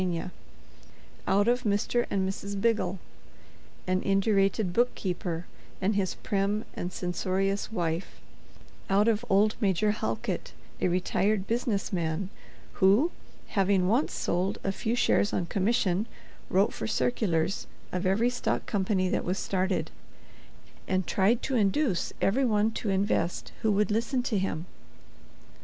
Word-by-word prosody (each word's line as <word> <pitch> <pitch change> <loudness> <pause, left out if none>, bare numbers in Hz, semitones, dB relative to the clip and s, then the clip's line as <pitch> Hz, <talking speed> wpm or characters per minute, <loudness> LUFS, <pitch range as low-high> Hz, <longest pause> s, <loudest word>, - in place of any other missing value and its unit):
—out 205 +2 +3
of 245 +1 +3
Mr. 210 +3 +1
and 190 -1 0
Mrs. 200 +1 -4
Biggle, 195 -4 +1 0.9
an 185 0 +1
indurated 195 +1 +2
head 175 - -4
bookkeeper 180 -7 -1 0.3
and 195 +3 +1
his 190 -3 0
prim 205 +2 -1
and 180 - -4
censorious 190 +3 -1
wife—out 190 +3 -3
of 225 0 +2
old 205 +3 +4
Major 205 +1 +2
Halkit, 115 - -3 0.3
a - - +3
retired 190 +3 +1
business 225 -4 -1
man, 170 +2 -1 0.5
who, 210 - +5 0.4
having 195 -2 +2
once 240 +9 +2
sold 180 +3 0
a 195 - 0
few 225 +4 -1
shares 210 -3 +2
on 175 - 0
commission, 200 +1 +1 0.4
wrote 195 +3 +3
for - - -4
circulars 195 -7 0 0.2
of 180 0 -2
every 220 +6 +2
stock 245 - -1
company 190 -2 +1
that - - 0
was 185 +2 -1
started, 185 0 -1 1.0
and 185 -1 +1
tried 210 +5 +2
to 270 - -2
induce 210 - +1
every 245 +8 +2
one 215 -2 +2
to 220 -1 -3
invest 190 -3 0
who 220 -2 +2
would 210 0 +2
listen 235 +4 0
to 225 -5 0
him? 175 -3 -2
195 Hz, 130 wpm, -28 LUFS, 185-220 Hz, 1.0 s, who